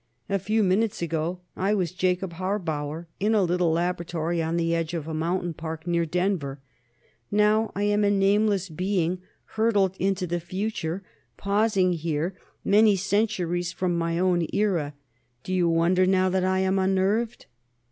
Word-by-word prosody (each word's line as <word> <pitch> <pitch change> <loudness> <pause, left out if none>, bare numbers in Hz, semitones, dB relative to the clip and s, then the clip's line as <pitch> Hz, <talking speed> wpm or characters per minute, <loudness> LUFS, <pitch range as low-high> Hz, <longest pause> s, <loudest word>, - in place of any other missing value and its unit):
A 195 0 +1
few 215 +4 +1
minutes 195 0 +1
ago, 165 +2 -2
I 195 +3 +1
was 180 -5 -1
Jacob 180 0 -1
Harbauer, 165 -4 -3
in 215 +3 +2
a 205 - +4
little 175 -1 +1
laboratory 170 -1 -1
on 165 +1 -1
the 165 0 +1
edge 165 0 -1
of 160 -2 -4
a 160 - -4
mountain 170 +2 -1
park, 160 0 -6
near 170 -1 0
Denver; 175 -5 -1 0.7
now 210 +1 +3
I 200 - -1
am 205 0 +2
a 200 - +4
nameless 200 0 +2
being 180 +1 -1 0.3
hurtled 205 -4 +1
into 190 0 0
the 175 0 -2
future, 185 0 -3 0.3
pausing 200 -2 +2
here, 165 +1 -2 0.3
many 210 +1 +5
centuries 185 -3 0
from 180 0 -1
my 165 0 -1
own 175 -2 +2
era. 170 -9 0 0.5
Do 185 - -4
you 175 -2 +2
wonder 175 +3 +3
now 185 0 +3
that 185 0 +1
I 190 0 +1
am 190 +1 +1
unnerved?" 195 +5 0
185 Hz, 155 wpm, -26 LUFS, 170-200 Hz, 0.7 s, many